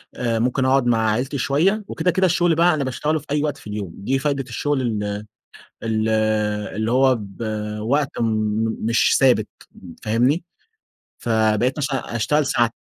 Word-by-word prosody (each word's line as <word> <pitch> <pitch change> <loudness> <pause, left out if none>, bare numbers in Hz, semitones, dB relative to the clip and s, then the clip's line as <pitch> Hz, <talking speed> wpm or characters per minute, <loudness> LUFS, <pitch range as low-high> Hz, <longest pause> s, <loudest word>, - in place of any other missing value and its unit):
آآ، 115 -2 -1
ممكن 125 +3 +1
أقعد 135 -1 +3
مع 110 -2 +2
عيلتي 130 +6 -1
شوية، 170 - +1
وكده، 180 - 0
كده 185 +2 +2
الشغل 175 -1 +2
بقى 170 +1 +4
أنا 150 -3 -1
باشتغله 150 +4 -1
في 145 - -17
أي 145 0 +1
وقت 150 -2 -2
في - - -14
اليوم، 105 -4 -5
دي 130 +7 -1
فايدة 140 -1 -1
الشغل 145 +4 -1
ال 110 -4 -1 0.8
ال 110 -1 0 0.7
اللي 110 +1 -1
هو 130 +1 +4
ب 100 +1 -10 0.4
وقت 135 +5 +1
م - - +2 0.6
مش 115 +2 +3
ثابت 125 -5 +4 0.6
فاهمني؟ 125 +9 +2 0.8
فبقيت 110 +2 +1
مثلًا 135 -5 -3
أشتغل 150 +6 +1
ساع 120 -4 +2
130 Hz, 160 wpm, -21 LUFS, 115-145 Hz, 0.8 s, بقى